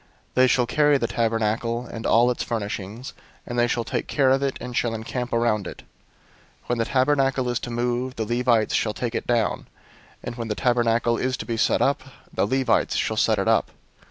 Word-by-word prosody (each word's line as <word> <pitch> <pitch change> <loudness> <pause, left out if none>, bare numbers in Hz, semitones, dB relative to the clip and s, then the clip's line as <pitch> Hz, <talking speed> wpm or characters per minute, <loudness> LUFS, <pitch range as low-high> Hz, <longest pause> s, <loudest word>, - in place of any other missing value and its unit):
They 130 0 +5
shall 125 -1 +3
carry 145 +3 +3
the 120 - -1
tabernacle, 115 +1 -1
and 115 -1 -5
all 120 +2 +4
its 125 - -3
furnishings; 110 +1 -4 0.3
and 120 0 -3
they 120 - +4
shall 120 -1 -1
take 115 - -3
care 135 -3 +2
of 135 +1 +3
it, 140 -1 -1
and 125 -1 -7
shall 115 -2 0
encamp 120 +2 -4
around 115 -3 +1
it. - - -9 0.8
001:051 - - -27
When 120 - +1
the 115 - +1
tabernacle 135 -1 +1
is 120 - 0
to - - -6
move, 120 +2 -2
the 110 - -2
Levites 120 -1 +1
shall 105 -2 0
take 120 -2 -3
it - - -3
down; 120 -3 0 0.6
and 120 - -6
when 115 -1 -4
the 105 - -2
tabernacle 120 -1 +2
is 130 0 -1
to - - -6
be 115 - -2
set 115 - +2
up, 140 -1 +1 0.3
the - - +1
Levites 130 0 +1
shall - - 0
set - - +2
it - - -1
up. - - +3
120 Hz, 210 wpm, -24 LUFS, 115-130 Hz, 0.8 s, They